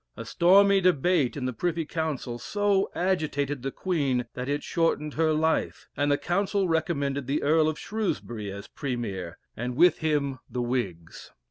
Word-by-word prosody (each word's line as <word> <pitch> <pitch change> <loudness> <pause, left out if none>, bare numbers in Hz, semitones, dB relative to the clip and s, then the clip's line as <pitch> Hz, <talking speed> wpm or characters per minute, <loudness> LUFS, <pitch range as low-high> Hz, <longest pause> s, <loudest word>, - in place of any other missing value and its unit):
A - - -6
stormy 195 +3 +5
debate 175 -5 +2
in 130 - -3
the 130 - -2
Privy 165 +4 -1
Council 150 -7 -3
so 205 +2 +1
agitated 150 -7 -1
the 135 - -2
Queen, 140 -7 -1
that 125 +2 -5
it 145 0 -1
shortened 160 -3 0
her 160 0 +2
life, 160 +1 0
and 145 0 +1
the 145 - +3
Council 195 +3 0
recommended 140 -5 -1
the 140 +3 0
Earl 155 +1 +4
of 155 - -4
Shrewsbury 120 - -3
as 100 +1 -8
Premier, 100 - -4 0.2
and 125 +2 -4
with 170 +3 +5
him 145 -4 0
the 125 -1 -2
Whigs. 100 -10 -4
150 Hz, 160 wpm, -27 LUFS, 130-175 Hz, 0.2 s, stormy